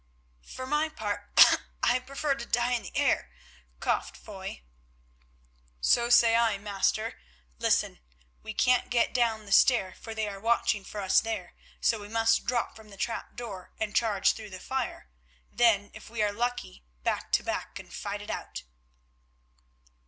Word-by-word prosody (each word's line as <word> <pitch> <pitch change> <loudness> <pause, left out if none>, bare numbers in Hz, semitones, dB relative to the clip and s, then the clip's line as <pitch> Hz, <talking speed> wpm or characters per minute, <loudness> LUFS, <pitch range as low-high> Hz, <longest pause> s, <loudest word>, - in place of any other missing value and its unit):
"For 255 - -7
my 300 +3 +1
part, 310 - -3 0.4
I 245 +1 +4
prefer 275 +3 -2
to 235 -3 -6
die 240 +1 +1
in 245 -2 +1
the - - -7
air," - - +2 0.5
coughed - - -1
Foy. 60 - -8 1.2
"So 235 - +3
say 235 -1 +6
I, 230 -3 +3
master. 205 +2 -1 0.4
Listen. - - +1 0.4
We 220 -1 -7
can't 250 0 +3
get 235 -1 +2
down 225 -3 +1
the 200 - -11
stair, 195 -4 +4
for 225 -1 -9
they 220 -1 -1
are 200 -1 -6
watching 220 -2 +1
for 205 +1 -6
us 190 -1 +4
there, 220 -6 -4 0.3
so 225 - +2
we 205 - -9
must 225 +1 +2
drop 240 -1 -1
from 220 -1 -14
the 200 - -13
trap 230 +4 -4
door 205 -7 -8
and 215 -1 -3
charge 210 -4 +3
through 215 -2 -9
the 185 -1 -8
fire. 260 - -4 0.4
Then, 210 -4 +3
if 215 - -11
we 225 -1 -1
are 205 -1 +1
lucky, 230 - -3 0.2
back - - -2
to - - +3
back - - -4
and - - -11
fight - - -5
it - - -6
out." - - -6
225 Hz, 165 wpm, -28 LUFS, 205-240 Hz, 1.2 s, say